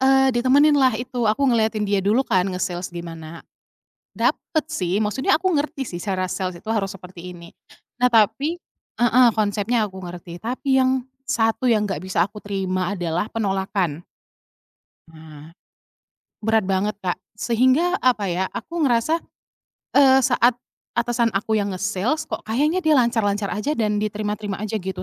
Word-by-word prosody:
Eee, 265 0 +4
ditemeninlah 270 +1 +4
itu, 250 -1 -3
aku 215 +5 +1
ngeliatin 220 -3 +1
dia 200 -1 +2
dulu 215 +6 +3
kan, 185 -5 +2
nge-sales 180 -1 -3
gimana. 165 -1 -8 0.7
Dapat 315 -2 0
sih, 190 - -1
maksudnya 240 +8 +1
aku 375 +3 0
ngerti 285 -2 -2
sih 175 - -6
cara 185 -2 -2
sales 185 -2 -3
itu 220 - -10
harus 205 -4 -1
seperti 180 -1 -10
ini. 170 -1 -12 0.5
Nah, 250 - +5
tapi 230 - +2 0.4
heeh, 245 +1 +5
konsepnya 215 +1 0
aku 190 - -12
ngerti, 175 0 -8
tapi 260 +3 0
yang 260 0 +2 0.2
satu 225 -2 0
yang 215 -2 +3
nggak 195 -3 -3
bisa 185 -2 +1
aku 205 +2 -13
terima 190 -2 -2
adalah 175 -1 -2
penolakan. 190 -6 -1 1.1
Nah. 155 -1 -13 0.9
Berat 220 0 +2
banget, 195 +3 0
Kak, 180 -2 -1 0.2
sehingga, 260 - +2
apa 220 -7 +1
ya, 180 +2 0
aku 340 - -5
ngerasa, 245 +6 +2 0.8
eee, 265 -2 +6
saat 245 -1 +3 0.4
atasan 235 0 +1
aku 210 +2 -1
yang 205 -2 0
nge-sales, 200 +10 -1
kok - - -5
kayaknya 295 +11 0
dia 310 -3 +4
lancar-lancar 215 -4 +1
aja 255 +8 -2
dan 210 -2 0
diterima-terima 210 -1 -3
aja 215 +1 -4
gitu 190 -3 -4
215 Hz, 150 wpm, -22 LUFS, 190-250 Hz, 1.1 s, eee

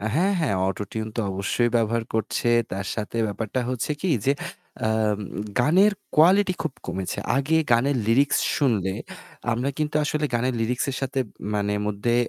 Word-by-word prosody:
অ্যা 110 - -2
হ্যাঁ, 195 +4 +3
হ্যাঁ 130 - +1
অটোটিউন 105 +3 -4
তো - - +1
অবশ্যই 105 +5 0
ব্যবহার 115 0 +1
করছে। 110 +2 0 0.2
তার 95 +1 -3
সাথে 110 +1 -4
ব্যাপারটা 110 +4 -2
হচ্ছে 130 +3 -2
কি 185 - 0
যে, 135 - +4 0.5
আম 110 -2 +1 0.4
গানের 185 +10 +5 0.2
কোয়ালিটি 185 +4 +5
খুব 160 - -2
কমেছে। 95 +1 -3 0.2
আগে 140 +4 +2 0.2
গানের 130 +4 +3
লিরিক্স 135 +5 +3 0.2
শুনলে, 105 -10 +1 0.6
আমরা 125 +4 -1
কিন্তু 150 -1 -1
আসলে 150 0 -1
গানের 125 +2 +1
লিরিক্সের 125 +4 -1
সাথে 135 0 -1 0.3
মানে 105 0 0
মধ্যে 105 +3 0
120 Hz, 150 wpm, -24 LUFS, 105-145 Hz, 0.6 s, গানের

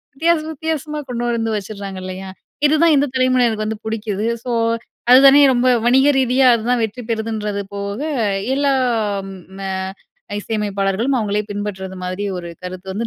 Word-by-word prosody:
வித்தியாசம் 320 +1 +1
வித்தியாசமா 305 0 -3
கொண்டு 240 0 -2
வந்து 225 -1 -1
வச்சுடுறாங்க 200 -2 -6
இல்லையா? 185 +1 -6 0.4
இதுதான் 310 +1 +4
இந்த 285 - +3
தலைமுறையினருக்கு 250 -4 +2
வந்து 220 0 -5
புடிக்குது. 215 -1 -2 0.2
ஸோ 245 - -2 0.6
அது 255 - +10
தானே 275 +1 +8
ரொம்ப 250 0 +2 0.2
வணிக 265 +4 +5
ரீதியா, 260 0 +3
அதுதான் 235 +1 0
வெற்றி 225 +3 -3
பெறுதுன்றது 220 -2 -2
போக 200 +4 -4 0.5
எல்லாம் 240 -8 0 0.3
ம - - -7 0.8
இசையமைப்பாளர்களும், 205 +3 -1
அவங்களே 210 -1 0
பின்பற்றுவது 190 -2 -5
மாதிரி 185 +3 -3
ஒரு 170 -1 -6
கருத்து 185 +1 -7
வந்து 220 +5 -3
225 Hz, 140 wpm, -19 LUFS, 200-260 Hz, 0.8 s, அது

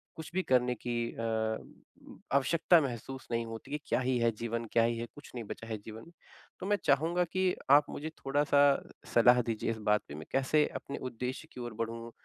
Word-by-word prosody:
कुछ 160 +1 -8
भी 185 0 +1
करने 125 -1 +2
की 120 +2 -4 0.2
अ, 110 -1 -1 0.8
आवश्यकता 165 +5 +4
महसूस 130 0 -5
नहीं 115 0 0
होती 115 +5 -8
है। - - +1
क्या - - +2
ही 125 0 +1
है 115 0 +3
जीवन? 115 0 -2
क्या 115 - +5
ही 115 0 +1
है? 115 - -3
कुछ 145 - -12
नहीं 120 - -4
बचा 115 - -7
है 110 -1 -3
जीवन। 115 +9 -9 0.5
तो - - -5
मैं 205 - +3
चाहूँगा 165 +5 +3
कि 185 -1 +2 0.2
आप 145 +1 +8
मुझे 155 +2 -5 0.2
थोड़ा-सा 145 +1 +3 0.5
सलाह 125 +1 +6
दीजिए 115 -1 -2
इस 110 - -4
बात 105 - +4
पे 70 - -8
मैं 75 - -8
कैसे 140 +3 +3
अपने 140 - -5
उद्देश्य 125 +6 -5
की - - -9
ओर 120 -2 -5
बढ़ूँ 115 +1 -4
125 Hz, 200 wpm, -31 LUFS, 115-145 Hz, 0.8 s, आप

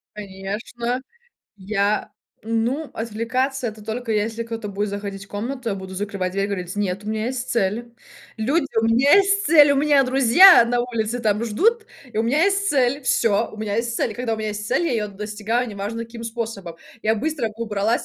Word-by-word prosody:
Конечно, 210 +5 -4 0.6
я 200 +1 -1 0.4
Ну, 235 +7 -1
отвлекаться 240 +4 -2
это 215 0 -9
только 225 +2 -4
если 220 +2 -1
кто-то 230 -2 -6
будет 200 +1 -2
заходить 200 -1 -6
в - - -22
комнату. 235 +4 -4
Я - - -1
буду 190 -1 -8
закрывать 195 -2 -3
дверь 195 +1 0
и - - 0
говорить: 185 -1 -4
"Нет, 200 -1 -2
у 210 - -7
меня 215 0 -2
есть 255 0 -4
цель. 235 +2 -1 0.4
Люди, 280 +8 +1
у 225 - +2
меня 245 +6 +5
есть 395 0 +3
цель, 295 -2 +7
у - - +1
меня 285 0 +4
друзья 265 +5 +7
на 240 0 +1
улице 235 -1 -2
там 215 -1 +1
ждут 435 - +1 0.3
и 215 - -3
у - - +3
меня 270 +8 +2
есть 400 0 +1
цель. 270 -2 +2
Всё, 230 -3 +2
у - - -12
меня 215 -1 -3
есть 230 0 -1
цель". 220 - -1
Когда 240 -1 -2
у - - -6
меня 215 0 -3
есть 210 0 -5
цель - - +1
я 335 - 0
её 215 -3 -1
достигаю, 210 +4 -2
неважно 215 +2 -5
каким 230 0 -10
способом, 225 -7 -5 0.3
я 220 +1 +2
быстро 275 0 -2
убралась,. 220 0 -1
225 Hz, 195 wpm, -22 LUFS, 210-250 Hz, 0.6 s, цель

